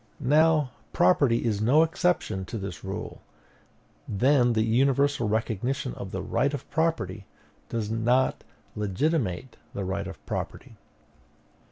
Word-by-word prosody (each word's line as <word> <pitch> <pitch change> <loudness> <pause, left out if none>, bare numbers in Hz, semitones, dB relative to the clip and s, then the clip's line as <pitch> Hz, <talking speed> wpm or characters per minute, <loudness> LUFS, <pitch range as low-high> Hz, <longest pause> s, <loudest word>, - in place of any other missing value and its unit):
Now, 155 -3 +4 0.2
property 115 +6 +3
is 105 -3 0
no 135 +9 +5
exception 165 - 0
to 115 - -5
this 95 -5 -6
rule: - - -6 0.9
then 125 +3 +3
the 110 -1 +2
universal 130 +1 +2
recognition 110 - -1
of - - -7
the - - -4
right 140 +1 0
of - - -8
property 110 - -1 0.4
does 110 -2 -3
not 120 +3 +1 0.3
legitimate 105 - -1 0.2
the 100 - -3
right 95 +1 -3
of - - -8
property. - - -5
115 Hz, 125 wpm, -27 LUFS, 105-140 Hz, 0.9 s, no